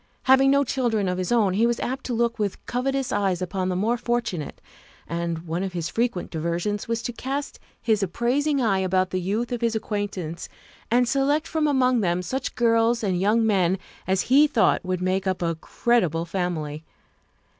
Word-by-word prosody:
Having 265 +1 +5
no 280 +1 +4
children 235 -6 0
of 180 0 -1
his 185 +2 -2
own, 215 -6 +3
he 225 +5 +3
was 235 0 0
apt 260 +2 -3
to 250 - -2
look 235 0 0
with 205 -2 -3
covetous 270 +1 -1
eyes 195 -3 +1
upon 185 0 -2
the 180 - -1
more 220 +6 +1
fortunate, 230 -9 -2 0.5
and 170 0 -3
one 170 +2 -2
of 190 -1 -3
his 170 -2 -3
frequent 230 -6 -1
diversions 170 +5 -2
was 230 0 -2
to 245 - -3
cast 275 +4 -4 0.2
his 220 -3 +1
appraising 260 - 0
eye 210 -6 +2
about 185 0 +1
the 185 - -1
youth 215 +7 -2
of 245 -1 -2
his 230 -1 +1
acquaintance 200 -6 -4 0.4
and 245 +1 +3
select 285 +4 +1
from 315 -1 0
among 255 -3 +3
them 180 -1 0
such 265 +8 -3
girls 230 0 +2
and 185 -3 0
young 220 +3 +3
men 190 -4 +2 0.3
as 190 0 +2
he 285 +4 +5
thought 240 -7 +2
would 185 -1 -2
make 185 +1 0
up 185 -1 -1
a 165 0 +1
creditable 170 -1 0
family. 165 -4 -3
210 Hz, 190 wpm, -24 LUFS, 180-240 Hz, 0.5 s, Having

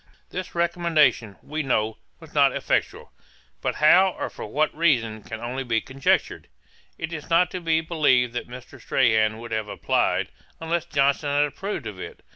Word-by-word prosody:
This 185 0 -6
recommendation, 165 - +2
we 155 +1 -3
know, 110 -6 -1 0.2
was - - -15
not - - +4
effectual; - - -2 0.5
but - - -1
how, 185 +5 +5
or - - -4
for - - -8
what 155 +1 0
reason, 120 -10 +1
can 110 +2 -8
only 125 +3 -4
be 115 -3 0
conjectured. 135 +4 -1 0.5
It 165 +1 -5
is 155 -1 -7
not 170 +2 +3
to 185 - -5
be 160 -1 +1
believed 145 -7 +2
that 120 - -5
Mr. 125 0 -11
Strahan 110 -3 +2
would 115 0 -9
have 110 -1 -2
applied, - - 0 0.3
unless 165 +1 -2
Johnson 140 -2 +1
had 145 +1 +3
approved 195 +8 -5
of - - -7
it. 435 +2 -9
145 Hz, 170 wpm, -24 LUFS, 120-165 Hz, 0.5 s, how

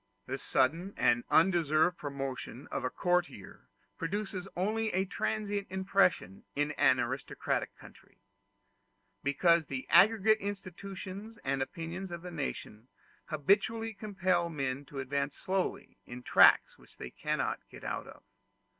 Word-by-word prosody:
The 135 +1 -4
sudden 165 +9 0
and 120 0 +3
undeserved 165 -1 +3
promotion 135 -2 -5
of - - -2
a 125 - 0
courtier 175 - -2 0.3
produces 195 +1 -3
only 215 +4 0
a 190 +2 +1
transient 205 0 -2
impression 190 - +1
in 145 +1 0
an 130 -3 +4
aristocratic 130 +2 -2
country, - - -17 1.0
because 165 +4 +3
the 130 -1 -5
aggregate 215 +4 +6
institutions 195 +2 -7
and 135 0 -1
opinions 170 +7 -5
of 170 -1 -7
the 180 - -7
nation 130 -7 -5 0.4
habitually 210 +8 +1
compel 185 -5 0
men 140 -3 -3
to 140 - -11
advance 140 +1 -2
slowly 190 0 -2
in 125 +1 -8
tracks - - +5
which - - -21
they 60 - -7
cannot - - -2
get - - -12
out - - -4
of. - - -13
170 Hz, 130 wpm, -31 LUFS, 140-195 Hz, 1.0 s, aggregate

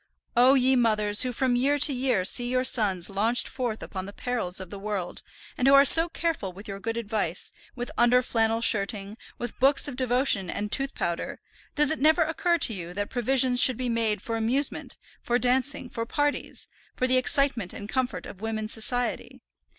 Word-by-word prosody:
O 250 +3 +5
ye 260 0 +3
mothers 215 -4 +2
who 255 - +3
from 250 +1 0
year 275 +4 +1
to 290 0 +6
year 250 -7 0
see 240 +5 +1
your 255 0 0
sons 200 -8 +1
launched 220 +5 +2
forth 240 -4 -4
upon 190 -1 -7
the - - -8
perils 225 -6 -3
of 185 -2 -9
the 200 - -8
world, 200 -3 -4 0.4
and 255 - +2
who 275 - +7
are 275 0 +7
so 330 +4 +7
careful 325 - -3
with 200 +4 -12
your 195 -1 -7
good 225 +3 -4
advice, 210 -6 -2 0.2
with 245 +3 -6
under 245 +1 +4
flannel 225 -1 0
shirting, 205 -2 -1 0.2
with 240 -1 -7
books 275 +3 +3
of 285 - -6
devotion 250 -7 0
and 210 +3 -3
tooth 275 0 +1
powder, 170 0 -4 0.4
does 295 0 +2
it 315 - -2
never 315 +4 +4
occur 340 +2 0
to 245 - +3
you 175 -2 -7
that 205 0 -4
provision 255 +1 +2
should 250 -1 +4
be 255 -1 -3
made 225 -2 -1
for 230 -1 -3
amusement, 250 +6 -2 0.2
for 240 - 0
dancing, 255 +2 -1
for 230 -1 -6
parties, 290 +2 -3 0.3
for 255 - -1
the 255 0 +2
excitement 255 -6 +1
and 205 - -8
comfort 260 +2 -2
of 195 - -11
women's 220 -1 -3
society? 245 +2 -3
240 Hz, 195 wpm, -26 LUFS, 210-260 Hz, 0.4 s, who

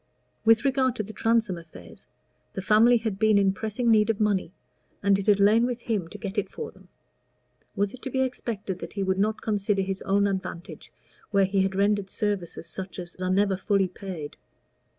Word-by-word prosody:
With 225 +2 +5
regard 260 -2 +2
to 215 - -2
the 215 +2 -9
Transome 225 -6 +1
affairs, 155 - -14 0.5
the - - -4
family 225 +4 +5
had 220 -4 -3
been 215 -1 +4
in 195 -1 +3
pressing 220 +4 0
need 215 0 +4
of 225 - 0
money, 205 -5 +1 0.5
and 200 0 +4
it 200 - -5
had 205 -1 +5
lain 220 +4 +5
with 245 -1 -4
him 210 -8 -2
to - - -10
get 205 -1 -3
it 205 - -4
for 460 -1 -7
them: - - -20 0.9
was 200 0 0
it 255 - -11
to - - -5
be 265 +1 0
expected 215 -7 -4
that - - -8
he 200 - -2
would 190 0 0
not 215 +2 0
consider 205 -2 0
his 190 0 -4
own 200 +1 +2
advantage 190 -3 -5 0.4
where 200 -2 +3
he 195 +1 +1
had 190 0 0
rendered 200 0 +1
services 200 -6 -3
such 185 +3 -6
as 175 -2 -7
are 185 0 -2
never 195 +1 +2
fully 195 0 +1
paid? 180 -5 -8
200 Hz, 200 wpm, -26 LUFS, 190-220 Hz, 0.9 s, With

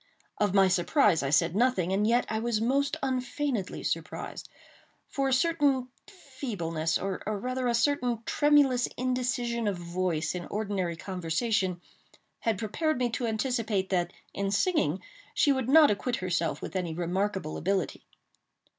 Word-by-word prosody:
Of 205 -2 +1
my 195 -1 +6
surprise 185 - +3
I 135 - -1
said 165 +4 +2
nothing, 210 -6 +2
and 205 +2 +2
yet 240 +2 +3 0.2
was 235 -2 0
I 225 - 0
most 280 +4 +1
unfeignedly 255 -4 -2
surprised; - - -4 0.6
for 275 -1 0
a - - +2
certain 275 -3 +2 0.2
feebleness, 205 - -3
or 195 -1 -3
rather 250 +5 -2
a 240 - +2
certain 245 -2 +1
tremulous 285 -4 +3
indecision 245 -2 -1
of 200 -3 0
voice 170 -2 -2
in 180 -1 -5
ordinary 200 -5 -2
conversation, 180 +2 -1 0.6
had 225 -3 0
prepared 265 - -1
me 245 -1 0
to 235 +1 -2
anticipate 220 -4 -1
that, 175 -2 0 0.2
in 200 0 -1
singing, 200 - +1 0.3
she 290 - +4
would 260 -3 0
not 305 -1 +7
acquit 240 +4 -1
herself 170 -6 -2
with 175 - -6
any 175 -4 -2
remarkable 180 -1 -2
ability. 190 +3 -1
215 Hz, 145 wpm, -28 LUFS, 185-255 Hz, 0.6 s, not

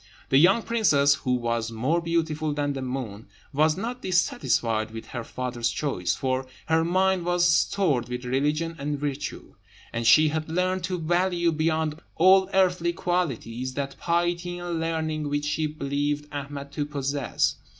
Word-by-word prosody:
The 135 - +5
young 195 +8 +5
princess, 155 -12 +3
who 130 -2 -1
was 115 -2 -1
more 130 +10 0
beautiful 160 -3 -1
than 145 -1 -1
the 135 - -4
moon, 125 -5 -5 0.3
was 155 +3 +3
not 240 +5 -4
dissatisfied 120 -10 +1
with 115 0 -9
her 120 -2 -5
father's 120 0 -2
choice; 120 - -1
for 130 0 -1 0.2
her 160 0 +2
mind 185 +1 +2
was 175 0 +2
stored 160 -6 +2
with 125 0 -5
religion 150 +6 0
and 145 +1 -2
virtue, 145 0 -4 0.4
and 115 0 -1
she 155 +6 +7
had 155 +1 -3
learnt 180 +1 0
to 185 -1 -2
value 175 +1 +1
beyond 155 0 0
all 190 +2 +5
earthly 180 -2 +2
qualities 130 -9 -2
that 140 -1 -3
piety 175 +1 0
and 175 -1 -3
learning 160 -2 -2
which 145 0 -1
she 155 +1 0
believed 145 0 -2
Ahmed 140 0 -6
to 145 0 -3
possess. 140 -2 -1
150 Hz, 155 wpm, -26 LUFS, 135-170 Hz, 0.4 s, she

